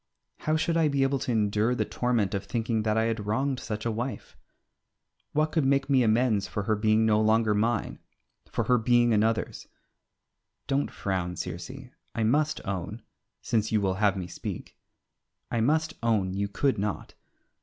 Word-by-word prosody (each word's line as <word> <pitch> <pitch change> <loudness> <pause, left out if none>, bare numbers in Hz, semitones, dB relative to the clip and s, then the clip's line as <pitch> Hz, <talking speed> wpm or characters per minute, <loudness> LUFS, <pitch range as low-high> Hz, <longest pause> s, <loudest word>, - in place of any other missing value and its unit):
How 155 - 0
should 165 +1 0
I 160 -2 +4
be 140 -2 +1
able 135 0 +1
to 130 - -2
endure 110 +2 +1
the - - 0
torment 120 -6 0
of 100 - -2
thinking 115 -2 -1
that 110 0 0
I 110 - +3
had 115 -2 -2
wronged 130 +4 0
such 110 -3 -5
a 115 - +1
wife? 120 +4 -5 1.0
What 155 +1 +1
could 160 - +1
make 135 +1 +1
me 130 -2 +5
amends 110 -2 +2
for 105 - -3
her 110 +2 +1
being 110 +1 +2
no 110 -1 +3
longer 110 0 +3
mine, 110 +1 0 0.5
for - - 0
her 125 -1 +3
being 120 0 +3
another's? 110 +1 0 1.0
Don't 140 +1 0
frown, 90 -3 -3
Circe, 85 +3 -5 0.5
I 115 - 0
must 150 +7 +1
own 100 +4 -4 0.4
since 110 -2 0
you 110 - +3
will 95 -2 +1
have 100 -2 +3
me 90 - -3
speak - - -7 0.8
I 115 - 0
must 155 +6 +1
own 105 -5 +1
you 100 +1 -1
could 130 +5 0
not. 105 0 -3
110 Hz, 175 wpm, -27 LUFS, 105-130 Hz, 1.0 s, me